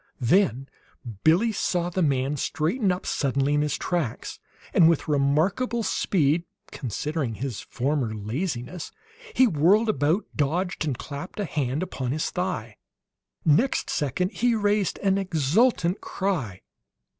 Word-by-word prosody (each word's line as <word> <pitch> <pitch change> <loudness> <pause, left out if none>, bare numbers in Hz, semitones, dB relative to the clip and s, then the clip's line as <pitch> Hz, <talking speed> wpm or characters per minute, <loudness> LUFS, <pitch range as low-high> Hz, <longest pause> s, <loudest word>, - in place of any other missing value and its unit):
Then 135 - +2 0.6
Billie 180 +9 +4
saw 175 -4 -1
the 185 - -1
man 140 -2 +1
straighten 170 - 0
up 180 +1 -3
suddenly 140 0 0
in 145 - +2
his 150 -2 0
tracks, 170 -10 -3 0.3
and 165 -2 +6
with 165 - +1
remarkable 160 - +1
speed, 165 -6 +1 0.3
considering 135 - -3
his 125 -1 -4
former 130 -3 -2
laziness, 125 - -4 0.4
he 260 - +6
whirled 200 - +3
about, 155 +4 +1
dodged, 165 +4 -1
and 135 -5 -1
clapped 145 +10 -7
a 205 - 0
hand 140 0 -1
upon 130 -8 -3
his 155 - -2
thigh. 180 - -3 0.7
Next 165 - +2
second 150 +7 -1
he 240 -1 +1
raised 205 -2 +1
an 195 0 +3
exultant 180 - +1
cry. 155 - -2
160 Hz, 130 wpm, -25 LUFS, 135-190 Hz, 0.7 s, and